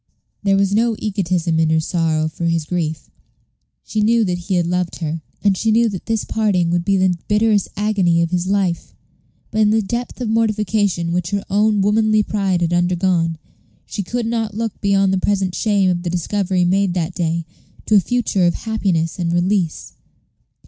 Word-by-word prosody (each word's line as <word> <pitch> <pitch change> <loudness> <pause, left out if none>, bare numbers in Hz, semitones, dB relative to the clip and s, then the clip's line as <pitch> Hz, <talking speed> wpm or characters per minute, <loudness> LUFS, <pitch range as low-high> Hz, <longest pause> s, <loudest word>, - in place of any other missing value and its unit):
There 195 -1 +2
was 195 0 +1
no 230 +1 +2
egotism 180 -5 -1
in 160 -1 +2
her 160 0 +3
sorrow 160 -1 0
for 165 +2 -5
his 165 -2 0
grief. 160 -3 -3 0.7
She 215 - -2
knew 230 +2 +3
that 180 -3 -1
he 185 +2 -2
had 175 -1 +1
loved 180 0 -1
her, 160 -1 -4 0.2
and 200 -2 +3
she 220 +4 -1
knew 230 +1 +3
that 190 -4 -7
this 225 -2 0
parting 195 -6 +1
would 175 0 +1
be 195 +1 +2
the 185 -1 +3
bitterest 210 -1 +2
agony 195 -5 +2
of 170 - -2
his 180 0 -1
life; 190 -3 -1 0.6
but 220 - 0
in 210 - +4
the 220 0 +2
depth 240 +6 -4
of 245 - -2
mortification 215 -5 0
which 175 -1 -1
her 200 -1 -2
own 210 0 +2
womanly 215 +1 +3
pride 195 -4 -1
had 170 0 0
undergone, 175 -1 +1 0.5
she - - -4
could 235 +5 -3
not 225 -2 -2
look 225 -2 -4
beyond 195 -1 +2
the 190 - +1
present 190 -2 0
shame 200 -2 +2
of 175 -1 -2
the 175 - -3
discovery 180 +1 0
made 190 0 +1
that 175 0 -2
day 170 -2 -1 0.4
to - - 0
a 205 - +8
future 200 -3 +1
of 175 - +1
happiness 190 -7 -1
and 170 -1 -1
release. 175 - -1
190 Hz, 190 wpm, -19 LUFS, 175-210 Hz, 0.7 s, a